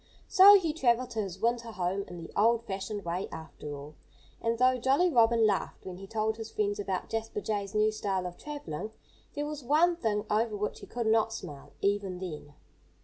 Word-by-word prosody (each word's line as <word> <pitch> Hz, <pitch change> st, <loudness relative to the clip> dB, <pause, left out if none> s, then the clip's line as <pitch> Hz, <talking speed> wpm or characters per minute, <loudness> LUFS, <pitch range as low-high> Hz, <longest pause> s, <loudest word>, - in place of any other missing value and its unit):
So 400 Hz, +1 st, +9 dB
he 330 Hz, -4 st, -1 dB
travelled 255 Hz, -4 st, +1 dB
to 225 Hz, -, -3 dB
his 190 Hz, -2 st, -6 dB
winter 235 Hz, +1 st, 0 dB
home 190 Hz, +1 st, -1 dB
in 175 Hz, -, -9 dB
the 165 Hz, -1 st, -9 dB
old 230 Hz, +2 st, +3 dB
fashioned 200 Hz, 0 st, -4 dB
way, 175 Hz, +3 st, -2 dB
after 160 Hz, -2 st, -8 dB
all. 145 Hz, +2 st, -9 dB, 0.5 s
And 230 Hz, 0 st, 0 dB
though 255 Hz, +1 st, +3 dB
Jolly 275 Hz, +9 st, +3 dB
Robin 230 Hz, -3 st, +4 dB
laughed 205 Hz, -3 st, -1 dB
when 185 Hz, -1 st, -7 dB
he 195 Hz, +1 st, -10 dB
told 220 Hz, +1 st, -1 dB
his 225 Hz, -1 st, -6 dB
friends 205 Hz, -2 st, -1 dB
about 190 Hz, -2 st, -2 dB
Jasper 225 Hz, -1 st, -3 dB
Jay's 205 Hz, -1 st, -3 dB
new 215 Hz, 0 st, +3 dB
style 195 Hz, -3 st, -2 dB
of 175 Hz, -1 st, -5 dB
travelling, 215 Hz, -, -6 dB, 0.5 s
there 290 Hz, -, -2 dB
was 300 Hz, -2 st, -6 dB
one 315 Hz, +7 st, +4 dB
thing 215 Hz, -9 st, -1 dB
over 215 Hz, 0 st, 0 dB
which 210 Hz, +1 st, -3 dB
he -, -, -11 dB
could 240 Hz, -1 st, -3 dB
not 220 Hz, 0 st, +3 dB
smile, 145 Hz, -9 st, -8 dB
even 200 Hz, -2 st, 0 dB
then. 150 Hz, -5 st, -7 dB
215 Hz, 200 wpm, -30 LUFS, 190-235 Hz, 0.5 s, So